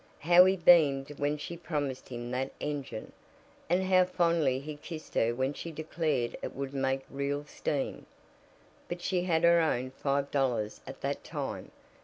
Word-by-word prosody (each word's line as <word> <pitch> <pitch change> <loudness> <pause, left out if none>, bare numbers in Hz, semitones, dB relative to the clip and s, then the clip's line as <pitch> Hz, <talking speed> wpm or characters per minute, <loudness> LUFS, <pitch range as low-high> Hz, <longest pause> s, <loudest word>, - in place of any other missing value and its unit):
How 175 +3 +7
he 190 +1 +3
beamed 145 -5 +4
when 145 +1 0
she 170 +3 -6
promised 150 -6 -3
him 120 -1 -6
that 130 +1 -2
engine! 140 -6 -4 0.6
And 180 +2 +3
how 185 -1 +5
fondly 170 -7 +2
he 150 +2 -7
kissed 155 +1 -9
her 115 +1 +2
when 130 +3 0
she 165 - -6
declared 155 -5 -1
it - - -5
would 140 0 -4
make 135 0 0
real 140 +1 -3
steam! 145 -2 -3 0.8
But 175 0 -5
she 180 -2 0
had 165 -3 +1
her 170 0 +6
own 130 -5 0
five 140 +1 -1
dollars 125 -7 0
at - - -9
that - - -2
time. - - -5
145 Hz, 165 wpm, -30 LUFS, 135-170 Hz, 0.8 s, How